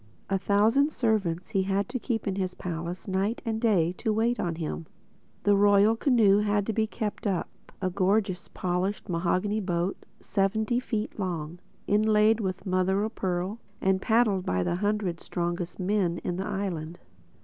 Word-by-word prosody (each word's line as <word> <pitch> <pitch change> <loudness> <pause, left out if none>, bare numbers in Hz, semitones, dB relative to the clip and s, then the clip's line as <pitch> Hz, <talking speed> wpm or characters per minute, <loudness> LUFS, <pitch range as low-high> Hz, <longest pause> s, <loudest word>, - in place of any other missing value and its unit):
A 195 - +2
thousand 220 +10 +3
servants 200 - 0
he 195 -3 +2
had 195 +1 0
to 255 +1 -3
keep 235 -2 -2
in 195 - 0
his 185 -2 -2
palace, 170 +2 -5
night 195 +4 0
and 225 -1 -2
day, 190 -8 +3
to 220 - 0
wait 230 +3 +1
on 170 -2 -1
him. 160 -1 -4 0.6
The 205 0 +4
Royal 205 +2 +5
Canoe 225 -6 +4
had 205 -1 +1
to 220 - -1
be 220 +1 +1
kept 215 0 -4
up—a 185 0 -4
gorgeous, 195 -1 +1
polished 185 +3 -2
mahogany 185 +5 0
boat, 180 -1 -2 0.2
seventy 220 +4 0
feet 220 -4 -3
long, 170 -3 -3 0.3
inlaid 215 +1 +4
with 190 -3 -3
mother 185 +1 +1
o' 215 - -1
pearl 190 0 -2 0.2
and 190 0 +1
paddled 220 -4 +3
by 90 - 0
the 175 - -1
hundred 205 -4 -1
strongest 175 +1 -3
men 185 -2 +1
in 175 - -2
the 190 +2 -3
island. 175 -5 -3
195 Hz, 160 wpm, -27 LUFS, 180-215 Hz, 0.6 s, Royal